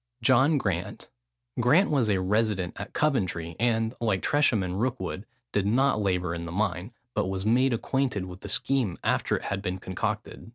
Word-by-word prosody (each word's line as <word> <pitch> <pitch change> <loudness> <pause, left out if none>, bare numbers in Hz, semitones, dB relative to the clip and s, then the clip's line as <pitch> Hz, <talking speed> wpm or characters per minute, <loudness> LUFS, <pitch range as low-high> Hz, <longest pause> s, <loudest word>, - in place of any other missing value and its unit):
JOHN 130 +5 +5
GRANT. 95 -8 -3 0.5
Grant 160 - +4
was 130 -7 +2
a 100 -2 +2
resident 100 -1 0
at 100 - -7
Coventry, 90 - 0
and, 115 -1 +1
like 110 -5 0
Tresham 145 -8 +3
and 90 +2 -3
Rookwood, 120 -5 -3 0.2
did 100 -1 0
not 130 +1 +2
labour 90 -3 0
in 85 0 -5
the - - -6
mine, 95 +1 -1 0.2
but 105 -3 0
was 95 +1 -3
made 125 +4 +3
acquainted 125 -4 -1
with 90 0 -10
the - - -7
scheme 125 -10 0
after - - +1
it - - -8
had 100 -1 -3
been 95 -2 -3
concocted. 105 +4 -4
105 Hz, 175 wpm, -27 LUFS, 95-125 Hz, 0.5 s, JOHN